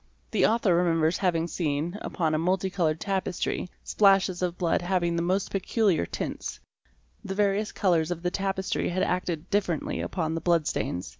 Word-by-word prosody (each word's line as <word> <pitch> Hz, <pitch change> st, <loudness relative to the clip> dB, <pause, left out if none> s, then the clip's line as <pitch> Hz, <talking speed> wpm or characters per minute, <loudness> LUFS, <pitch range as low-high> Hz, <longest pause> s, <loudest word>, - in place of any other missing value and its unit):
'The -, -, +2 dB
author 220 Hz, -5 st, +2 dB
remembers 165 Hz, -1 st, +2 dB
having 170 Hz, -3 st, +1 dB
seen, 160 Hz, +1 st, -2 dB
upon 160 Hz, -4 st, -1 dB
a -, -, +2 dB
multicoloured 180 Hz, -2 st, 0 dB
tapestry, 190 Hz, -2 st, -2 dB
splashes 195 Hz, -3 st, +3 dB
of 180 Hz, -1 st, -1 dB
blood 170 Hz, -1 st, +1 dB
having 175 Hz, -1 st, 0 dB
the 170 Hz, -, 0 dB
most 185 Hz, +3 st, 0 dB
peculiar 195 Hz, -, +1 dB
tints; -, -, -5 dB, 0.6 s
the 195 Hz, -, -4 dB
various 205 Hz, +1 st, +1 dB
colours 170 Hz, -4 st, +1 dB
of 175 Hz, -1 st, -4 dB
the 180 Hz, -, 0 dB
tapestry 195 Hz, 0 st, -1 dB
had 185 Hz, +1 st, 0 dB
acted 180 Hz, -2 st, -1 dB
differently 185 Hz, -6 st, 0 dB
upon 160 Hz, -3 st, -2 dB
the 165 Hz, -, -3 dB
blood 170 Hz, -3 st, +2 dB
stains. 90 Hz, -10 st, -2 dB
180 Hz, 160 wpm, -27 LUFS, 165-190 Hz, 0.6 s, splashes